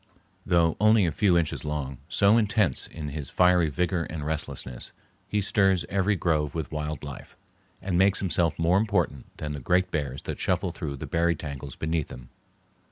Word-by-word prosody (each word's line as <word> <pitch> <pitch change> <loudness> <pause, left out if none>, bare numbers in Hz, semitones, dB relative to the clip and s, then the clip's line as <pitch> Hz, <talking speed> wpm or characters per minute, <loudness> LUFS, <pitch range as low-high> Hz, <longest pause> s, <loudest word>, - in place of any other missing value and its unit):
Though 85 -2 +3
only 110 -2 +5
a 85 - +1
few 90 +2 +3
inches 85 -3 -1
long, 75 -4 -4
so 100 +3 +4
intense 105 - +2
is 75 -3 -7
his 75 -3 -5
fiery 90 -3 +4
vigor 85 +2 -1
and 75 -2 -6
restlessness, 70 -5 -5 0.3
he 105 - 0
stirs 95 -3 +2
every 100 +2 +1
grove 75 -5 0
with 80 -3 -4
wild 75 -1 -4
life, 70 -2 -9 0.5
and 90 -2 0
makes 95 +1 +4
himself 85 -3 0
more 85 +3 +3
important 100 -10 0
than 75 - -4
the 75 - -4
great 90 +7 +1
bears 70 -4 -3
that - - -5
shuffle - - 0
through 70 -2 -5
the 65 - -6
berry 85 0 +1
tangles 70 -3 -7
beneath 80 -1 -2
him. 60 0 -10
85 Hz, 175 wpm, -26 LUFS, 75-95 Hz, 0.5 s, only